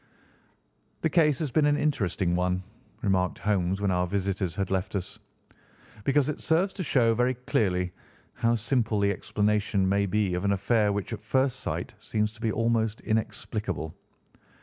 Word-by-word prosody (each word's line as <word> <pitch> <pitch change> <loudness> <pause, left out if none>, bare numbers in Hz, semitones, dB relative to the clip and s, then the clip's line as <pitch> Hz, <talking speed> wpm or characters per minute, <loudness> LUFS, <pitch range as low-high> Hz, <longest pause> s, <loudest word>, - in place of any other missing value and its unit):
"The 160 - +1
case 150 -5 +4
has 150 -3 -2
been 150 +4 +3
an 145 0 +3
interesting 95 - 0
one," 90 +1 0 0.4
remarked 95 -3 +1
Holmes 95 -2 0
when 100 -2 +1
our 90 0 +1
visitors 95 -2 -1
had 95 -2 -2
left 95 +2 -1
us, 90 -2 -4 0.9
"because 140 0 +3
it 150 - -3
serves 175 +4 +2
to 195 - -5
show 120 -7 +3
very 125 +3 +1
clearly 90 -7 0 0.4
how 115 0 +1
simple 115 -2 0
the 100 0 +3
explanation 105 0 0
may 100 +1 +2
be 100 -1 +1
of 90 +1 -2
an 100 0 +2
affair 105 +2 +2
which 100 +2 -3
at 105 - -5
first 130 +4 +1
sight - - -4
seems 105 0 -1
to 110 0 -18
be 110 -2 +1
almost 115 -1 +1
inexplicable. 105 -7 -2
105 Hz, 165 wpm, -27 LUFS, 95-120 Hz, 0.9 s, case